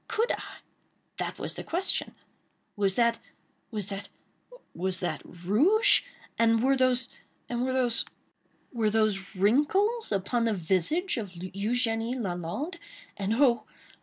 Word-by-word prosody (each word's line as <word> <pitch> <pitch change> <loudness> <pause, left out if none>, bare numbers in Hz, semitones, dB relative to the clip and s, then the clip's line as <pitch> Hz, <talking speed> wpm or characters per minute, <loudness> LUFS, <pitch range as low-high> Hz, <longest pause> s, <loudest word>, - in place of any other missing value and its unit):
—could 455 +2 +1
I?—that - - -8
was - - -4
the - - -6
question. 365 +3 -1 0.6
Was 200 -3 +1
that—was 230 -2 -2
that—was 195 - -7
that 180 - -2
rouge? 250 - +3 0.4
And 230 0 +4
were 270 +1 +4
those—and 250 -1 -2
were 260 - 0
those—were 240 -2 -2
those 210 -3 0
wrinkles, 300 - +2
upon 215 +4 0
the 225 -2 +1
visage 190 - +1
of 220 -3 -3
Eugénie 225 +6 -1
Lalande? 190 - -3 0.4
And 200 +2 -1
oh! 250 -2 +3
230 Hz, 105 wpm, -28 LUFS, 195-260 Hz, 0.6 s, And